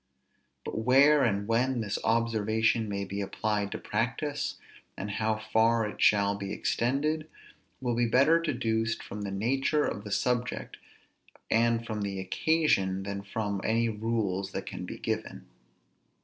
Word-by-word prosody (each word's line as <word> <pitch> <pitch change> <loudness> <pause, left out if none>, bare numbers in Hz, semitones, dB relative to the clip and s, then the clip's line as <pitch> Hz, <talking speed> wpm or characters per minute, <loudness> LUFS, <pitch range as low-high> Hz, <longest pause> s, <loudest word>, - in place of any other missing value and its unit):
But - - -3
where 135 +5 +5
and 100 -3 0
when 120 +2 +1
this 105 -1 -2
observation 110 -1 +1
may 100 0 -2
be 100 +1 -4
applied 100 +1 -1
to - - -3
practice, 140 +7 -2 0.4
and 100 +2 -4
how 110 +1 0
far 110 +1 +2
it 105 - -8
shall 100 -1 +4
be 100 -1 -5
extended, 150 +9 0 0.5
will 125 -2 -1
be 120 0 +2
better 140 +8 +5
deduced 115 -7 -1
from 105 - -7
the 100 - -3
nature 135 +9 +1
of 100 - -3
the 105 - -7
subject, 125 +4 -1 0.7
and 115 0 +2
from 110 -2 -4
the 100 -1 -3
occasion, 95 - +1
than 100 0 -4
from 100 0 -3
any 115 +1 +2
rules 105 -3 -2
that - - -4
can - - -6
be - - -6
given. - - -4
110 Hz, 150 wpm, -29 LUFS, 100-120 Hz, 0.7 s, where